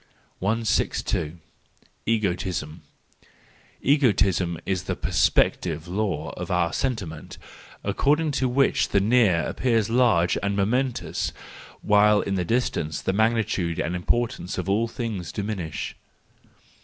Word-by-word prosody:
162. 100 -6 0 0.7
Egoism 90 -7 -1 1.0
.—Egoism 100 - +2
is 95 -2 -2
the - - -2
perspective 80 -2 +1
law 90 -5 -2
of - - -7
our 85 -2 +1
sentiment, 95 - -3 0.5
according 150 +2 +1
to 130 -2 0
which 135 +2 +2
the - - +3
near 105 -5 +3
appears 115 -4 0
large 115 -9 +3
and 100 0 -1
momentous, 120 +6 -1 0.5
while 105 0 +5
in 100 - -3
the 95 -2 0
distance 85 -7 -1
the 95 - -1
magnitude 110 -6 +1
and 85 +3 -1
importance 90 -1 -1
of 90 0 -3
all 105 +4 +2
things 115 - -4
diminish. 100 -8 -4
100 Hz, 110 wpm, -25 LUFS, 90-115 Hz, 1.0 s, while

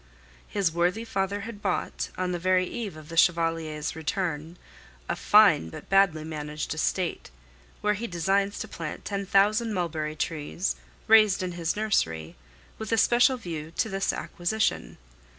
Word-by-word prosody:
His 195 -5 0
worthy 180 +7 0
father 200 -1 -2
had 215 -1 -8
bought, 190 -3 -2
on 185 0 -1
the 175 - -2
very 185 +1 +2
eve 205 -4 -5
of 155 -1 -12
the 165 - -7
Chevalier's 165 -3 +1
return, 160 0 -3 0.5
a - - -1
fine 200 - +5
but - - -10
badly 195 -6 +4
managed 150 -1 -4
estate, 170 +3 -2 0.5
where 210 0 +2
he 225 +3 -4
designs 195 +3 0
to 220 - -5
plant 165 -6 -7
ten 200 -1 -3
thousand 210 +3 +3
mulberry 155 -4 -2
trees, 155 +4 -2 0.3
raised 215 -4 +5
in 180 - -2
his 170 -1 -2
nursery 85 - -1 0.4
with 220 -1 -5
a 225 - +3
special 245 +4 +4
view 165 -7 -6
to 220 - +1
this 195 0 0
acquisition. 180 - -2
185 Hz, 150 wpm, -27 LUFS, 160-205 Hz, 0.5 s, fine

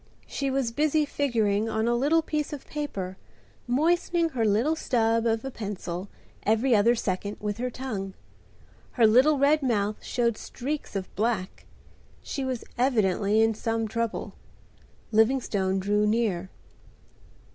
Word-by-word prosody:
She 275 -1 -2
was 265 -3 0
busy 300 +3 +2
figuring 225 -7 0
on 220 +1 0
a 240 - +3
little 295 +7 +2
piece 300 -1 -2
of 285 - -7
paper, 195 -11 -5 0.5
moistening 335 +5 +2
her 250 -7 -1
little 225 +10 +2
stub 230 -5 +1
of 225 +2 0
a 270 - -4
pencil, 200 -4 -5 0.3
every 225 +4 +3
other 225 +4 +4
second, 200 -1 -3
with 210 +1 -3
her 250 +1 -1
tongue. 215 -7 -5 0.8
Her 235 - +4
little 260 +7 +5
red 290 +3 +4
mouth 215 -5 0
showed 235 -3 0
streaks 280 -1 -5
of 190 -1 -5
black. 210 -3 -2 0.6
She 275 - -4
was 255 -3 -3 0.2
evidently 215 -4 +2
in 225 0 +3
some 225 +1 -2
trouble. 230 +1 -3 0.8
Livingstone 220 -4 +2
drew 205 +2 +1
near. 210 -5 0
230 Hz, 135 wpm, -27 LUFS, 210-270 Hz, 0.8 s, little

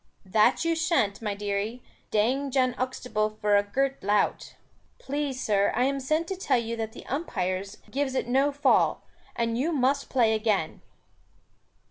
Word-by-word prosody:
"That 210 - +3
you 330 0 +2
shan't, 320 - +1
my 210 -2 -2
dearie, 205 +4 -3 0.3
dang 255 +7 +1
Jan 255 -1 +2
Uxtable 220 -4 -2
for 210 0 +3
a 200 - +5
girt 270 +7 -1
lout." 205 +1 0 0.4
"Please, 280 -1 -3
sir, 200 -4 +2
I 245 - +2
am 275 +1 0
sent 310 +5 0
to 385 - -2
tell 365 -8 +1
you 230 0 -2
that 220 -1 -4
the - - -11
umpires 195 - -3
gives 270 -1 -1
it 255 - -1
no 270 +4 +2
fall, 285 +1 +2 0.3
and 230 0 -1
you 310 +6 +1
must 275 -1 +1
play 235 -4 +3
again." 215 -7 0
245 Hz, 160 wpm, -27 LUFS, 210-275 Hz, 0.4 s, a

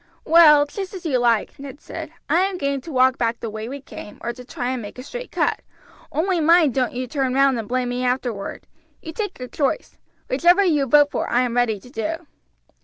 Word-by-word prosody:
"Well, 305 -3 +7
just 385 +6 -6
as 360 - -9
you 270 -6 +1
like," 235 -1 +1
Ned 275 0 -9
said, - - -8 0.2
"I 340 - +3
am 380 0 0
game 280 -3 -1
to 325 - -9
walk 260 -1 +3
back 230 0 0
the 225 - -5
way 220 +2 -6
we 280 +2 -6
came 210 -5 -10
or 235 - -3
to 250 - -11
try 250 -1 -4
and 255 -2 -3
make 205 +2 -9
a 255 - -7
straight - - -8
cut, - - 0 0.5
only 355 +2 0
mind 320 -3 +4
don't 255 0 0
you 255 +1 -3
turn 260 0 -1
round 275 -2 +3
and 220 - -6
blame 250 0 -1
me 245 +1 -2
afterward. 245 -5 -3 0.4
You 320 - -7
take 410 +1 -4
your 250 - -7
choice; 275 +1 -2 0.3
whichever 350 +9 +4
you 295 -6 +2
vote 290 +2 +5
for - - -2
I 245 - +2
am 245 -2 -1
ready 235 -4 +1
to 245 - -16
do." 325 +8 -4
265 Hz, 225 wpm, -22 LUFS, 245-320 Hz, 0.5 s, Well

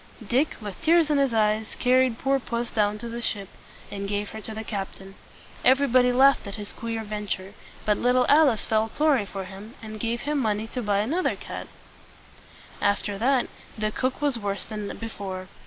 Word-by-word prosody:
Dick, 265 +8 +2
with 205 -3 -7
tears 325 -1 +4
in 290 - +3
his 275 -2 +3
eyes, 215 0 +1
carried 255 -1 +3
poor 270 +1 +1
puss 235 -1 -3
down 210 -1 +1
to 235 - -6
the 235 +1 -5
ship, 200 -4 -3 0.4
and 200 0 -4
gave 205 0 -1
her 220 - -7
to 220 - -8
the 220 - -4
captain. 195 -2 -6 0.5
Everybody 255 -2 +5
laughed 265 -2 +5
at 200 - -6
his 210 -2 -7
queer 230 -1 -4
venture; 205 -2 -4 0.3
but 210 -1 +2
little 250 0 +3
Alice 285 -8 +5
felt 220 0 0
sorry 290 -9 +3
for 195 -1 -5
him, 200 +5 -10
and 215 -1 -8
gave 235 +1 -1
him 295 0 0
money 215 -3 0
to 250 +3 -4
buy 205 -2 +1
another 315 - 0
cat. - - -7 1.1
After 200 0 0
that, 255 +2 +3 0.3
the 215 0 0
cook 255 +5 -2
was 280 -5 +1
worse 200 -3 -3
than 210 -2 -5
before. 190 -4 -6
220 Hz, 185 wpm, -26 LUFS, 205-255 Hz, 1.1 s, Everybody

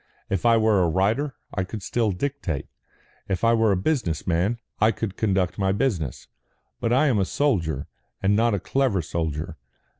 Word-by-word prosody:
If 95 +3 +1
I 115 -1 +6
were 110 -3 +3
a 85 - +3
writer, 110 - +1 0.2
I 95 - 0
could 100 +2 -7
still 115 0 0
dictate. 95 - -3 0.6
If 95 +1 -1
I 115 0 +5
were 115 -2 +3
a 95 - +2
business 95 - -1
man, 90 +7 +1 0.2
I 110 - +5
could 110 -4 -4
conduct 95 -3 0
my 95 -1 +2
business. 95 - -1 0.5
But 115 - -1
I 130 +5 +4
am 125 -8 +3
a - - +3
soldier, 85 - 0 0.3
and 100 +1 +2
not 115 0 +3
a - - -1
clever 125 -6 0
soldier. 80 0 -3
100 Hz, 180 wpm, -24 LUFS, 90-115 Hz, 0.6 s, I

